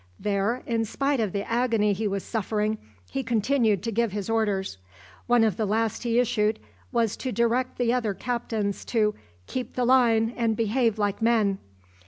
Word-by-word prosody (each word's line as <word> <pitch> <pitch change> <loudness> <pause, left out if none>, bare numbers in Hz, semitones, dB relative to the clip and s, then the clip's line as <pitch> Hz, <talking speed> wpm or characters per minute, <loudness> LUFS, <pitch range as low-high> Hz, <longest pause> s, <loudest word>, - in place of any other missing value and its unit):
There, 205 +4 0
in 230 -1 0
spite 275 +5 0
of 215 -4 0
the 200 +1 -3
agony 230 -3 +2
he 210 +2 -1
was 200 -1 -2
suffering, 215 0 -1 0.3
he 270 - -1
continued 230 -4 +1
to 230 - -2
give 230 -2 0
his 205 +1 -3
orders. 200 - 0 0.5
One 240 -1 +4
of 215 -5 +1
the 220 - 0
last 220 +1 0
he 235 -1 0
issued 220 -3 +2 0.3
was 230 -4 +1
to 260 - -3
direct 235 +2 0
the 240 -1 +2
other 225 -5 0
captains 225 -4 -2
to 215 -3 +1 0.3
"keep 250 - -5
the 250 - +1
line 235 -3 +4
and 225 -3 0
behave 230 0 +1
like 205 -1 -1
men." 220 -4 +2
225 Hz, 175 wpm, -26 LUFS, 210-240 Hz, 0.5 s, One